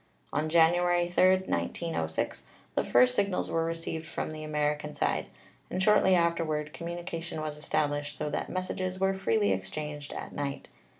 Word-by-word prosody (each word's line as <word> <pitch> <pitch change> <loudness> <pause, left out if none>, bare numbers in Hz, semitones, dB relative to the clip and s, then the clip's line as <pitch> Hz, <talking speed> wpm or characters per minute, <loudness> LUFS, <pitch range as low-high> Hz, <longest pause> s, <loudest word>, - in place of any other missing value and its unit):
"On 155 +1 0
January 175 +1 +4
3, 185 +1 +5
1906, 120 - -2 0.3
the - - +1
first 125 0 +5
signals 195 +5 0
were 165 - +1
received 165 -1 -3
from - - -3
the 155 0 -6
American 150 0 -1
side, - - 0 0.4
and 185 +1 -1
shortly 210 -3 +5
afterward 165 -3 0
commu 170 0 -5
nication 170 -2 -5
was 155 -1 -3
established, 145 -1 -1
so - - -2
that - - -2
messages 185 0 -2
were 190 0 +2
freely 110 - +2
exchanged 145 +11 -4
at - - -6
night. 140 -1 -4
160 Hz, 155 wpm, -29 LUFS, 150-175 Hz, 0.4 s, 3